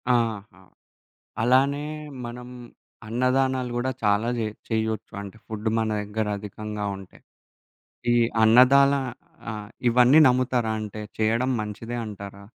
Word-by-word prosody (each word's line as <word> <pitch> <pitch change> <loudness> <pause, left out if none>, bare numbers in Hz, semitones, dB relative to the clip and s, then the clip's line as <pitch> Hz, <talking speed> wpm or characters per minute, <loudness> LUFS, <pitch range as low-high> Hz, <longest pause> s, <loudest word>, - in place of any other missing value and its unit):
ఆహా! 110 -5 -2 0.8
అలానే 135 +4 +3 0.4
మనం 120 +1 -7 0.6
అన్నదానాలు 130 +2 +1
గూడా 125 +2 0
చాలా 105 +2 +2
జే 110 - 0 0.2
చేయ్యొచ్చు 110 -1 -2
అంటే 100 +1 -10
ఫుడ్ 110 0 -3
మన 110 -1 0
దగ్గర 105 +1 -3
అధికంగా 105 +1 -6
ఉంటే. 95 -1 -13 1.0
ఈ - - +4 0.3
అన్నదాలా 140 +5 +6 0.5
ఆహ్, 105 -1 -7 0.2
ఇవన్నీ 125 +5 +6
నమ్ముతారా? 125 -2 +1
అంటే 105 0 -6 0.2
జేయడం 115 +4 +1
మంచిదే 110 +3 -5
అంటారా? 100 -1 -9
115 Hz, 110 wpm, -25 LUFS, 105-125 Hz, 1.0 s, అన్నదాలా